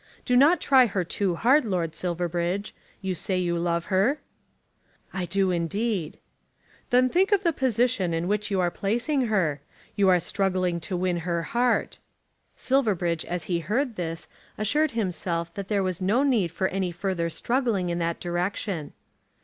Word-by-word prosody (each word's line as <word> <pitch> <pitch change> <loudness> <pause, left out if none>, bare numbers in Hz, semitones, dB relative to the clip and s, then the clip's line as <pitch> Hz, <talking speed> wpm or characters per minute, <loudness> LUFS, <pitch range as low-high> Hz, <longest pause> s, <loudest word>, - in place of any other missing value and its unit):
Do 250 - +2
not 295 +8 +6
try 260 -3 +5
her 195 -3 -1
too 180 +1 -1
hard, 260 - +4
Lord 180 -7 -1
Silverbridge. 175 +2 -2 0.3
You 190 -1 -1
say 185 +2 -2
you 175 -1 0
love 170 0 0
her." 215 +11 +3 1.0
"I 190 -2 -2
do, 190 +1 +2
indeed." 180 0 -1 0.7
"Then 250 +1 +4
think 375 +9 +2
of 405 -1 +3
the 335 -2 +2
position 240 - +1
in 165 +1 -1
which 210 +2 -1
you 195 -2 0
are 175 -1 +1
placing 240 - 0
her. 165 -10 0 0.3
You 195 -2 +4
are 180 -1 +5
struggling 185 -1 0
to 180 +3 -3
win 180 -1 0
her 170 0 -2
heart." 240 +6 0 0.6
Silverbridge 190 -11 0
as 175 -1 -3
he 175 -2 -1
heard 235 - -1
this 165 -3 -4 0.3
assured 300 +9 +1
himself 170 -4 -2
that 200 -1 -6
there 200 -2 +1
was 185 -1 -2
no 210 +9 +2
need 225 - +2
for 190 +2 0
any 190 -2 -1
further 175 -1 -2
struggling 230 -2 0
in 170 0 -1
that 170 0 -1
direction. 175 -1 -3
190 Hz, 165 wpm, -26 LUFS, 175-235 Hz, 1.0 s, not